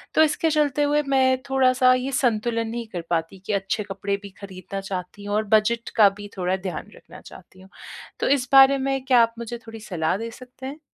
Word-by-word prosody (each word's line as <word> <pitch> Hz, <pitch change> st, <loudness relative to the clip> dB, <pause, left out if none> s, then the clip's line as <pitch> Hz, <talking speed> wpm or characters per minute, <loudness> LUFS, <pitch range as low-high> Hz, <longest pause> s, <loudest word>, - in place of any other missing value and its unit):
तो 315 Hz, -, +6 dB
इसके 315 Hz, +1 st, +1 dB
चलते 295 Hz, -1 st, +1 dB
हुए 295 Hz, +1 st, +2 dB
मैं 260 Hz, -1 st, +3 dB
थोड़ा-सा 255 Hz, -1 st, +4 dB
ये 255 Hz, +2 st, -1 dB
संतुलन 230 Hz, -2 st, 0 dB
नहीं 235 Hz, -1 st, -5 dB
कर 175 Hz, -, -3 dB
पाती 165 Hz, +3 st, -2 dB
कि 210 Hz, -, -2 dB
अच्छे 195 Hz, +2 st, -1 dB
कपड़े 200 Hz, 0 st, -3 dB
भी 200 Hz, -, -8 dB
ख़रीदना 195 Hz, 0 st, -7 dB
चाहती 195 Hz, +1 st, -6 dB
हूँ 205 Hz, 0 st, -2 dB
और 215 Hz, -, +1 dB
बजट 230 Hz, +2 st, +1 dB
का 205 Hz, -2 st, +7 dB
भी 205 Hz, 0 st, -8 dB
थोड़ा 185 Hz, +1 st, 0 dB
ध्यान 185 Hz, -1 st, -6 dB
रखना -, -, -14 dB
चाहती 185 Hz, -, -15 dB
हूँ। 190 Hz, -, -16 dB, 0.5 s
तो -, -, 0 dB
इस 265 Hz, -3 st, +2 dB
बारे 270 Hz, 0 st, +7 dB
में 270 Hz, -1 st, -1 dB
क्या 250 Hz, -3 st, +5 dB
आप 230 Hz, 0 st, +2 dB
मुझे 235 Hz, +1 st, -5 dB
थोड़ी 225 Hz, 0 st, -9 dB
सलाह 180 Hz, -3 st, -2 dB
दे 230 Hz, +1 st, -6 dB
सकते 255 Hz, +2 st, -12 dB
हैं? 290 Hz, +3 st, -8 dB
230 Hz, 215 wpm, -23 LUFS, 195-260 Hz, 0.5 s, का